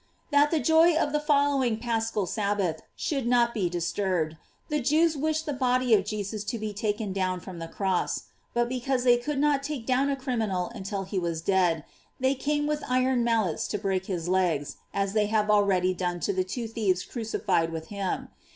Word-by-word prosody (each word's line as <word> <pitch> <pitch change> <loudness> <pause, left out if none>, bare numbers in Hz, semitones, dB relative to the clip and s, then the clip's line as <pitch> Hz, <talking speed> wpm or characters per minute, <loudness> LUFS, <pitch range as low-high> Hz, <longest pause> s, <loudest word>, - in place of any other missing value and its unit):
That 290 +1 +5
the 320 - +1
joy 320 +2 +5
of 295 -2 +1
the 300 - +1
following 285 -5 +2
Paschal 225 -3 -1
Sabbath 200 -5 -1
should 275 -5 -2
not 240 -1 +3
be 190 -6 0
disturbed, 175 -2 -1 0.3
the 300 -1 0
Jews 310 +5 +3
wished 315 +2 -1
the 295 - -2
body 255 -2 +2
of 195 -3 +4
Jesus 210 0 -3
to 220 +4 -2
be 215 -1 -4
taken 210 -1 -2
down 185 -1 -1
from 180 0 -9
the 165 - -5
cross; 190 +1 -1 0.3
but 240 0 +2
because 255 +1 -1
they 245 -1 +5
could 275 +4 -3
not 285 -1 +2
take 280 -4 -4
down 265 +3 +2
a 280 - +1
criminal 225 -8 -2
until 195 -2 -4
he 190 0 -2
was 170 -2 -2
dead, 175 -4 +2 0.4
they 260 +1 +2
came 295 +2 -1
with 300 0 -1
iron 255 -1 +2
mallets 225 -8 +1
to 210 - -2
break 190 -2 -1
his 175 -3 -3
legs, 175 -6 0
as 195 0 -1
they 210 -1 +2
had 210 0 +2
already 190 -3 +3
done 175 -1 -2
to 200 - 0
the 185 0 +1
two 225 +6 -4
thieves 205 -5 0
crucified 205 -7 -1
with 160 -1 -6
him. 200 -2 -3
215 Hz, 195 wpm, -27 LUFS, 190-260 Hz, 0.4 s, That